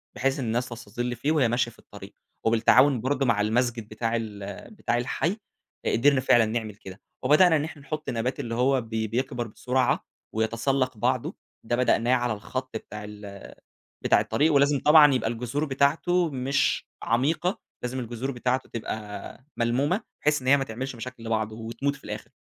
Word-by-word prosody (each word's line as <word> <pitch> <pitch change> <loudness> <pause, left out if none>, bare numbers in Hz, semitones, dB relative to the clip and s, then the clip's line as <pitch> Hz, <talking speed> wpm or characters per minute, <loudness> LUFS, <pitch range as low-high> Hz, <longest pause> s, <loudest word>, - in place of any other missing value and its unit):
بحيث 135 +2 0
إن 125 - -2
الناس 120 +2 -1
تستَظِل 120 +1 -4
فيه 140 +7 -1
وهي 145 -7 +3
ماشية 120 0 0
في - - -22
الطريق، - - -12 0.3
وبالتعاون 115 +3 +5
برضو 135 +1 0
مع 110 -4 +2
المسجد 115 0 0
بتاع 115 +1 -2
ال 105 - -6
بتاع 120 - -1
الحي، 165 - -1 0.5
قِدرنا 140 +3 +4
فعلًا 120 -3 +5
نعمل 110 -2 -3
كده، 95 -1 -11 0.2
وبدأنا 160 +5 +6
إن 145 - +1
إحنا 155 -2 -7
نحط 155 +2 -5
نبات 125 +3 -2
اللي 115 -4 -3
هو 130 +1 +2
ب 115 - -13
بيكبر 120 +3 -2
بسرعة، 125 +3 0 0.3
ويتسلَّق 115 +3 0
بعضه، - - 0 0.3
ده 120 +1 0
بدأناه 125 0 +2
على 120 -2 0
الخط 130 +4 -5
بتاع 105 -1 -9
ال 105 -1 -9 0.6
بتاع - - +5
الطريق، 155 +2 +2
ولازم 140 0 +4
طبعًا 150 -2 +7
يبقى 115 -2 0
الجذور 125 +6 -2
بتاعته 155 +5 +2
مش 135 +1 0 0.2
عميقة، 155 - +1 0.2
لازم 125 +1 -3
الجذور 120 +3 -4
بتاعته 125 +1 -1
تبقى 115 -2 -4 0.7
ملمومة؛ 140 - +1 0.2
بحيث 150 -2 +2
إن - - -8
هي 140 - +7
ما 135 - -1
تعملش 130 +3 -5
مشاكل 120 0 -8
لبعض 110 -1 -1
وتموت 115 +6 -3
في - - -20
الآخر. - - -7
125 Hz, 170 wpm, -26 LUFS, 115-140 Hz, 0.7 s, طبعًا